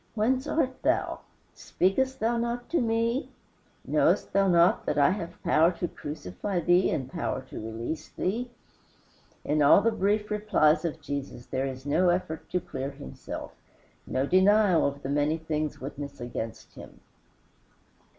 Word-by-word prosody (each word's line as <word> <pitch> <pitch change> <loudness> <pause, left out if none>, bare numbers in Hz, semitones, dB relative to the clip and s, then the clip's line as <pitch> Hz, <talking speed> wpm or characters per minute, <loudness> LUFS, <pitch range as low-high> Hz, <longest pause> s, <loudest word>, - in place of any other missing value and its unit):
"Whence 255 +5 +1
art 265 -5 -1
thou? - - 0 0.3
Speakest 260 +9 0
thou 230 +2 +1
not 235 +1 -3
to 340 - +2
me? 230 +3 0 0.6
Knowest - - +2
thou 195 0 +3
not 170 -1 +4
that 150 - 0
I 140 +4 +5
have 180 -4 -6
power 165 +3 +4
to 175 +1 -3
crucify 150 - -5
thee 175 +2 +3
and 135 -5 -2
power - - -3
to - - -6
release 115 +8 -5
thee?" 235 +6 -2 1.0
In 150 +1 +1
all 145 +7 +7
the 230 +3 +2
brief 210 0 0
replies 205 -7 +2
of 160 -1 -3
Jesus 140 -4 -5
there 135 +1 -2
is 130 0 -7
no 175 +5 +3
effort 175 -3 -2
to 180 - 0
clear 135 -5 -5
himself, 140 0 -8 0.6
no 130 +1 0
denial 190 0 +4
of 140 0 -5
the 135 - -4
many 145 +2 +1
things 155 -2 -3
witnessed 140 +1 -7
against 120 -2 -6
him. - - -13
170 Hz, 150 wpm, -27 LUFS, 145-210 Hz, 1.0 s, all